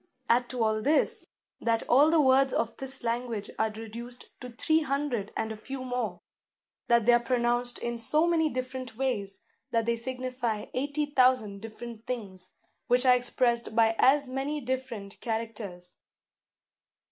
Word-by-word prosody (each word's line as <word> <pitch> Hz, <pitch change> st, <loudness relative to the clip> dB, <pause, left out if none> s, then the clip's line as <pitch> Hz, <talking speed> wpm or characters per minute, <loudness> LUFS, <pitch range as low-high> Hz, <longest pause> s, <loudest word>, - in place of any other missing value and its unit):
Add 245 Hz, +1 st, +3 dB
to 250 Hz, -3 st, -1 dB
all 215 Hz, 0 st, +1 dB
this, 295 Hz, +6 st, +1 dB, 0.3 s
that 230 Hz, -1 st, 0 dB
all 280 Hz, +5 st, +6 dB
the 325 Hz, 0 st, +4 dB
words 265 Hz, -1 st, +4 dB
of 230 Hz, 0 st, -1 dB
this 265 Hz, -1 st, -6 dB
language 235 Hz, -2 st, -2 dB
are 220 Hz, -, +2 dB
reduced 230 Hz, +3 st, -9 dB
to 250 Hz, -, -8 dB
three 315 Hz, +7 st, +1 dB
hundred 275 Hz, -8 st, -2 dB
and 220 Hz, 0 st, -2 dB
a -, -, -4 dB
few 260 Hz, +5 st, -7 dB
more; 250 Hz, -1 st, -3 dB, 0.7 s
that 235 Hz, -2 st, +4 dB
they 240 Hz, -, +6 dB
are 240 Hz, -, +6 dB
pronounced 240 Hz, 0 st, 0 dB
in 235 Hz, 0 st, -3 dB
so 305 Hz, +8 st, +2 dB
many 330 Hz, -2 st, +2 dB
different 255 Hz, -2 st, -5 dB
ways, 205 Hz, -7 st, -2 dB, 0.3 s
that 230 Hz, -2 st, +1 dB
they 235 Hz, 0 st, +1 dB
signify 250 Hz, -3 st, -3 dB
eighty 285 Hz, +3 st, -1 dB
thousand 255 Hz, -8 st, +2 dB
different 225 Hz, +1 st, -9 dB
things, 195 Hz, -7 st, -5 dB, 0.4 s
which 245 Hz, +2 st, +3 dB
are 250 Hz, -, +7 dB
expressed 240 Hz, -2 st, 0 dB
by 225 Hz, -1 st, +4 dB
as 280 Hz, +1 st, +5 dB
many 270 Hz, +4 st, -2 dB
different 250 Hz, -6 st, -5 dB
characters. 220 Hz, -6 st, -5 dB
245 Hz, 155 wpm, -28 LUFS, 225-260 Hz, 0.7 s, are